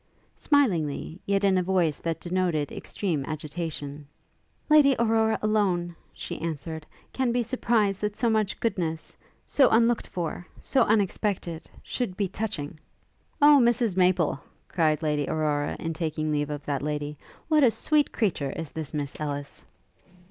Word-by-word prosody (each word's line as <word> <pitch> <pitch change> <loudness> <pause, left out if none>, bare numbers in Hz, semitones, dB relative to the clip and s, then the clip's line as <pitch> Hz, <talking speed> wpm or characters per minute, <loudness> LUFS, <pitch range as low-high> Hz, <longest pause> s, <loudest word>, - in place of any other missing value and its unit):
Smilingly, 175 - +1
yet 200 0 +1
in 190 -2 +4
a - - +2
voice 175 -4 +1
that 165 -1 -3
denoted 175 -5 -1
extreme 165 -9 -3
agitation, 150 -2 -5 0.6
'Lady 295 -3 +6
Aurora 225 -1 +2
alone,' 185 -5 +1 0.2
she - - -7
answered, 160 -1 -5 0.3
'can 260 -2 +1
be 245 0 +1
surprised 225 -5 +1
that 210 0 -1
so 240 - 0
much 215 -3 +1
goodness 165 -8 -2 0.3
so 270 -3 +4
unlooked 230 +1 +3
for 175 0 -4
so 265 - +2
unexpected 195 -5 -1
should 215 -8 -3
be 200 - +1
touching!' 175 -7 -5 0.6
'O 295 -1 +8
Mrs 235 -4 +2
Maple,' 180 -6 +2 0.3
cried 155 -2 +1
Lady 150 -2 0
Aurora, 150 -2 0
in 165 0 -3
taking 155 -2 -2
leave 145 -1 0
of 145 -1 -5
that 140 -2 -1
lady, 150 0 -3 0.3
'what 310 -2 +4
a 250 - +7
sweet 295 +5 +1
creature 175 - 0
is 165 -3 -6
this 160 -1 -5
Miss 145 -2 -3
Ellis!' 145 -2 -5
175 Hz, 145 wpm, -26 LUFS, 155-220 Hz, 0.6 s, O